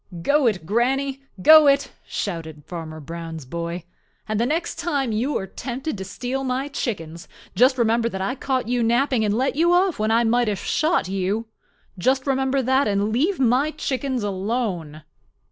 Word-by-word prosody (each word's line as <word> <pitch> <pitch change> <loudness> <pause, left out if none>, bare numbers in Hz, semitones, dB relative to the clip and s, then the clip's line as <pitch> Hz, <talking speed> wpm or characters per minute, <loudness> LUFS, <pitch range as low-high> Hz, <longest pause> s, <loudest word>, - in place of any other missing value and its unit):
"Go 285 - +3
it, 190 -7 -1
Granny! 265 - 0 0.2
Go 310 -1 +9
it!" 280 0 +3 0.2
shouted 160 -6 -5
Farmer 160 -3 -7
Brown's 165 0 -7
boy. 170 +4 -4 0.4
"And 215 -1 -1
the 235 - +2
next 325 +4 -2
time 280 -8 -1
you 240 +7 0
are 190 - -4
tempted 260 - -5
to 190 - -5
steal 250 +7 -4
my 260 +2 -2
chickens, 170 - -4 0.3
just 255 +6 +4
remember 230 0 +2
that 190 - -5
I 195 +5 -1
caught 260 -2 -2
you 245 0 0
napping 240 +1 +2
and 210 0 +1
let 265 +2 0
you 340 +3 +3
off 360 - +2
when 215 +1 +1
I 230 +1 +3
might 240 +1 +2
have 205 -2 0
shot 315 - 0
you. 195 +4 -2 0.5
Just 260 +7 +1
remember 270 0 +1
that 265 +1 +2
and 205 +1 0
leave 325 - +1
my 260 +4 +3
chickens 270 -5 -2
alone." 190 -6 -3
235 Hz, 175 wpm, -23 LUFS, 195-270 Hz, 0.5 s, Go